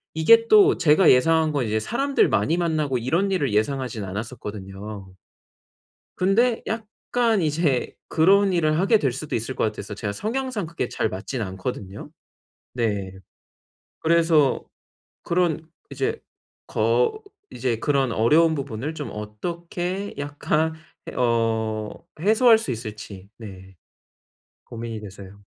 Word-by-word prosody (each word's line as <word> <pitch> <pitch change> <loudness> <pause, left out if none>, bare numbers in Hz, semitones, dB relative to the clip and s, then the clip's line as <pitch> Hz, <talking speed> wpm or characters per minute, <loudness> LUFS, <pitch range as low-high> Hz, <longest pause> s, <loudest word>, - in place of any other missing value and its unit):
이게 230 +9 +5
또 405 - +6
제가 155 +3 +5
예상한 160 +4 +3
건 140 -4 -1
이제 110 +1 0
사람들 275 - +1
많이 110 +11 +1
만나고 155 -6 0
이런 165 +12 0
일을 145 - 0
예상하지는 110 -1 -1
않았었거든요. 100 -2 -7 1.0
근데 225 +6 +2
약간 225 0 -1
이제 150 -4 0
그런 195 +4 +4
일을 155 -2 +2
하게 200 +5 +4
될 135 -9 0
수도 140 +4 -4
있을 115 +3 -4
것 - - 0
같아서 105 -1 -4
제가 105 0 -4
성향상 230 - -3
그게 165 -6 -4
잘 110 - -1
맞진 110 +6 -4
않거든요. 95 +3 -6 0.6
네. 105 -6 -2 0.9
그래서 165 -4 +3 0.6
그런 170 -2 0 0.2
이제 135 -1 -2 0.5
거 120 - +1 0.3
이제 125 -3 -1
그런 135 -3 +1
어려운 155 +10 +4
부분을 140 0 -4
좀 150 -2 -5
어떻게 175 - -5
약간 145 +2 -1 0.4
예 - - -9
어. 110 -1 -1
해소할 220 +6 +5
수 220 - -6
있을지, 105 -4 -8
네. 95 -4 -11 0.9
고민이 115 -2 -7
돼서요. 100 0 -11
140 Hz, 260 characters per minute, -23 LUFS, 110-170 Hz, 1.0 s, 또